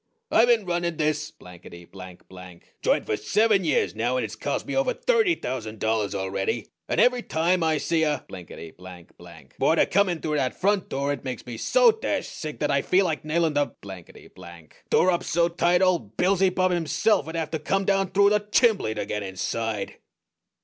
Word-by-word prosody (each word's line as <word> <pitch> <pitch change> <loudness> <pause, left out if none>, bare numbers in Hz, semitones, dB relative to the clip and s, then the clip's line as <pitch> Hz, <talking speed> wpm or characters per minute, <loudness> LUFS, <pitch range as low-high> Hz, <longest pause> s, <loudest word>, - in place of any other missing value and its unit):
I 225 - +5
been 230 -4 +3
running 175 -2 -2
this 150 -1 -1
blankety 85 -1 -14
blank 90 -1 -13
blank 90 -2 -14
joint - - +1
for - - -1
seven 205 - +2
years 135 - +1
now, 120 +4 -1
and - - -1
it's - - -7
cost - - -3
me - - -4
over - - +1
thirty 455 -8 +2
thousand 110 - -5
dollars 110 -2 -1
already, 95 0 -2 0.2
and - - 0
every 250 0 +4
time 170 0 0
I 160 -1 +1
see 165 +2 0
a 150 -4 0
blinkety 85 -2 -10
blank 90 -2 -13
blank - - -15
boarder - - +3
come 200 0 +2
in 175 -2 -2
through 150 -1 -2
that 130 -3 -1
front 200 0 +1
door 140 +1 -1
it - - -8
makes 130 -3 -6
me 120 - -7
so - - +4
dashed 445 - -3
sick 155 -2 -7
that 150 - +1
I 140 0 +2
feel 190 +6 +2
like 160 -4 -2
nailin' 160 +1 0
the 145 -1 -1
blankety 95 -4 -12
blank 85 -3 -15
door 185 - +4
up 175 0 -1
so 170 +1 +1
tight 175 +1 +2
old 170 - 0
Beelzybub 185 0 +2
himself'd 170 -1 0
have 160 -1 -3
to 160 - -2
come 195 +6 -1
down 195 -1 +1
through 200 +1 +4
the 210 - +3
chimbley 210 - +1
to 105 - -3
get 105 - -3
inside!" 100 +2 -4
155 Hz, 200 wpm, -25 LUFS, -, 0.2 s, I